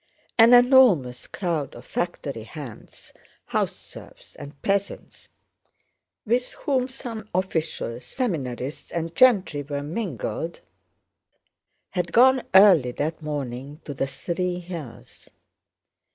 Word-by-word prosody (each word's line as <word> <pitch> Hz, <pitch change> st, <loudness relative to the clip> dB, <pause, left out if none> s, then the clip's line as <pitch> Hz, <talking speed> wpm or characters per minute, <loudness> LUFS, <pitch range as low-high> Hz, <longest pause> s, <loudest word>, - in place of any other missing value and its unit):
An 230 Hz, +2 st, +9 dB
enormous 245 Hz, -, +5 dB
crowd 165 Hz, -7 st, -3 dB
of 120 Hz, -, -12 dB
factory 145 Hz, -8 st, -3 dB
hands, 115 Hz, +1 st, -11 dB, 0.3 s
house -, -, -1 dB
serfs, -, -, -14 dB
and 140 Hz, 0 st, -11 dB
peasants, 200 Hz, 0 st, -2 dB, 1.0 s
with 245 Hz, +3 st, 0 dB
whom 260 Hz, -3 st, -1 dB
some 235 Hz, -5 st, -7 dB
officials, 160 Hz, -9 st, -2 dB
seminarists, 135 Hz, -, -4 dB
and 165 Hz, 0 st, -3 dB
gentry 200 Hz, -, +4 dB
were 145 Hz, 0 st, -4 dB
mingled, 165 Hz, -, -4 dB, 1.3 s
had 180 Hz, -2 st, -2 dB
gone 260 Hz, +4 st, +6 dB
early 180 Hz, -11 st, +7 dB
that 155 Hz, +5 st, -3 dB
morning 140 Hz, -1 st, -5 dB
to 145 Hz, -, -5 dB
the 135 Hz, 0 st, -2 dB
Three 180 Hz, +5 st, -3 dB
Hills. 170 Hz, -9 st, -9 dB
165 Hz, 105 wpm, -24 LUFS, 140-210 Hz, 1.3 s, An